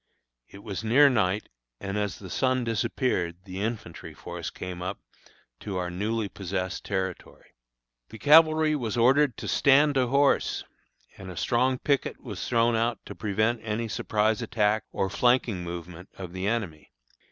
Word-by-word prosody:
It 100 Hz, +1 st, -13 dB
was 100 Hz, 0 st, -5 dB
near 135 Hz, +6 st, +6 dB
night, 105 Hz, -3 st, 0 dB, 0.3 s
and 100 Hz, 0 st, -4 dB
as 105 Hz, -4 st, -2 dB
the 95 Hz, -3 st, -10 dB
sun 130 Hz, -1 st, +1 dB
disappeared 110 Hz, -6 st, -1 dB
the 95 Hz, 0 st, -6 dB
infantry 110 Hz, -6 st, -5 dB
force -, -, -6 dB
came 90 Hz, -1 st, -7 dB
up 95 Hz, +2 st, -3 dB, 0.6 s
to 100 Hz, -3 st, -5 dB
our 90 Hz, -1 st, -2 dB
newly 105 Hz, +4 st, -1 dB
possessed 95 Hz, -1 st, -4 dB
territory. 95 Hz, -2 st, -5 dB, 0.6 s
The -, -, -10 dB
cavalry 155 Hz, +2 st, +5 dB
was 120 Hz, -6 st, -3 dB
ordered 130 Hz, +2 st, +4 dB
to -, -, -6 dB
"stand 145 Hz, +2 st, +4 dB
to 130 Hz, -2 st, +2 dB
horse," 140 Hz, +2 st, +2 dB, 0.6 s
and 95 Hz, -1 st, -8 dB
a 90 Hz, -, -9 dB
strong 130 Hz, +1 st, +1 dB
picket 140 Hz, +1 st, -1 dB
was 105 Hz, -7 st, -6 dB
thrown 115 Hz, -1 st, +3 dB
out 115 Hz, +1 st, +1 dB
to -, -, -7 dB
prevent 110 Hz, +3 st, 0 dB
any 115 Hz, +1 st, -2 dB
surprise 110 Hz, 0 st, 0 dB
attack 110 Hz, -1 st, +1 dB
or 95 Hz, -, -1 dB
flanking 120 Hz, -3 st, +1 dB
movement 85 Hz, +1 st, -8 dB
of 90 Hz, -2 st, -7 dB
the 95 Hz, +1 st, -3 dB
enemy. 100 Hz, -9 st, -3 dB
110 Hz, 155 wpm, -27 LUFS, 95-125 Hz, 0.6 s, near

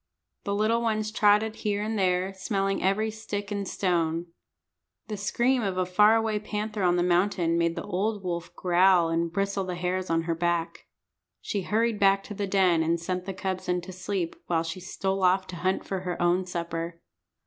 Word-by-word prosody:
The 200 Hz, -1 st, -1 dB
little 220 Hz, +3 st, +2 dB
ones 215 Hz, -2 st, 0 dB
trotted 215 Hz, +1 st, +3 dB
here 205 Hz, -1 st, -1 dB
and 220 Hz, +1 st, -2 dB
there, 185 Hz, -1 st, +1 dB
smelling 195 Hz, 0 st, -1 dB
every 210 Hz, +4 st, +1 dB
stick 210 Hz, -1 st, -5 dB
and 200 Hz, -1 st, -2 dB
stone. 170 Hz, -3 st, 0 dB, 0.8 s
The 215 Hz, -, -2 dB
scream 240 Hz, +5 st, +1 dB
of 195 Hz, -4 st, -2 dB
a 185 Hz, -, +1 dB
far 210 Hz, +4 st, +5 dB
away 220 Hz, -2 st, +1 dB
panther 210 Hz, 0 st, -4 dB
on 175 Hz, -1 st, +3 dB
the 175 Hz, -, +2 dB
mountain 175 Hz, -1 st, +2 dB
made 170 Hz, 0 st, +1 dB
the -, -, -4 dB
old 205 Hz, +2 st, -2 dB
wolf 175 Hz, -1 st, -4 dB
growl 180 Hz, -1 st, +4 dB
and 165 Hz, 0 st, 0 dB
bristle 195 Hz, +1 st, -1 dB
the 180 Hz, -1 st, -4 dB
hairs 180 Hz, +1 st, -2 dB
on 165 Hz, 0 st, +1 dB
her 165 Hz, 0 st, -1 dB
back. 170 Hz, +1 st, -2 dB, 0.5 s
She 200 Hz, -, -3 dB
hurried 220 Hz, +3 st, 0 dB
back 195 Hz, 0 st, +4 dB
to 210 Hz, -, -8 dB
the 200 Hz, 0 st, -3 dB
den 185 Hz, -4 st, +3 dB
and 165 Hz, +1 st, +1 dB
sent 180 Hz, +2 st, -3 dB
the 195 Hz, -, -4 dB
cubs 190 Hz, -1 st, -3 dB
in 180 Hz, 0 st, +2 dB
to 180 Hz, +2 st, -9 dB
sleep, 185 Hz, -1 st, -3 dB
while 165 Hz, -2 st, +1 dB
she 165 Hz, +2 st, -5 dB
stole 190 Hz, +1 st, -2 dB
off 185 Hz, +1 st, +3 dB
to 180 Hz, -, -8 dB
hunt 185 Hz, +3 st, -1 dB
for 190 Hz, -, -3 dB
her 180 Hz, -1 st, -4 dB
own 175 Hz, +1 st, +2 dB
supper. 170 Hz, -1 st, -4 dB
190 Hz, 195 wpm, -27 LUFS, 175-205 Hz, 0.8 s, far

